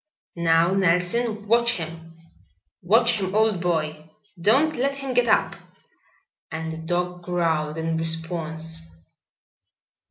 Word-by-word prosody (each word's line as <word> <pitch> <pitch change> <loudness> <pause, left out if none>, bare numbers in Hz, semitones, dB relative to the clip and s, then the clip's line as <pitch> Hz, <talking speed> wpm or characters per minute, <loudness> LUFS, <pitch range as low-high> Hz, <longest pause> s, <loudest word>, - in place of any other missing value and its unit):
"Now, 170 +1 +3
Nelson, 195 +4 +1
watch 235 +2 +3
him. 165 -3 -8 0.6
Watch 225 +4 +3
him, 190 0 -3
old 215 -4 +2
boy. 155 -3 -2 0.3
Don't 275 - +3
let 275 +3 0
him 275 -2 -4
get 245 -1 +3
up." - - +2 1.0
And 160 0 -4
the - - -7
dog 180 +2 -2
growled 165 -3 -1
in 160 0 -1
response. 165 0 -3
175 Hz, 115 wpm, -24 LUFS, 165-220 Hz, 1.0 s, Now